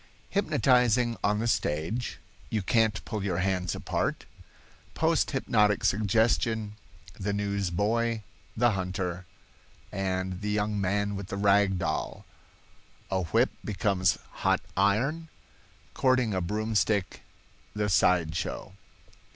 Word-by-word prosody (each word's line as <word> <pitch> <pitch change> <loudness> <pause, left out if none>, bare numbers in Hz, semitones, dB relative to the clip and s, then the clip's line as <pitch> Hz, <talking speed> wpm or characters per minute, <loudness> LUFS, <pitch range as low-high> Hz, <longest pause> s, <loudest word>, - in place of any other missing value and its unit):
Hypnotizing 125 - +3
on 105 +1 +2
the 115 +2 -1
Stage—"You 110 +3 -2
Can't 110 +1 +1
Pull 110 -4 -4
Your 95 -4 -1
Hands 90 -1 0
Apart"—Post - - -3
Hypnotic 105 -1 +2
Suggestion—The 105 -1 -1
News 100 -2 -1
boy, 110 +5 0 0.3
the 120 +1 +4
Hunter, 90 -2 -3 0.6
and 95 -1 -2
the 105 - -2
Young 105 0 0
Man 100 +1 0
with 100 -1 -6
the 100 - -5
Rag 100 -1 +3
Doll—A 85 +3 -6
Whip 80 - +2
Becomes 95 -3 +1 0.2
Hot - - +2
Iron—Courting 130 - -1
a 95 - 0
Broomstick—The 105 +1 -2
Side 85 -4 +3
Show. 90 +2 -4
100 Hz, 95 wpm, -28 LUFS, 95-110 Hz, 0.6 s, the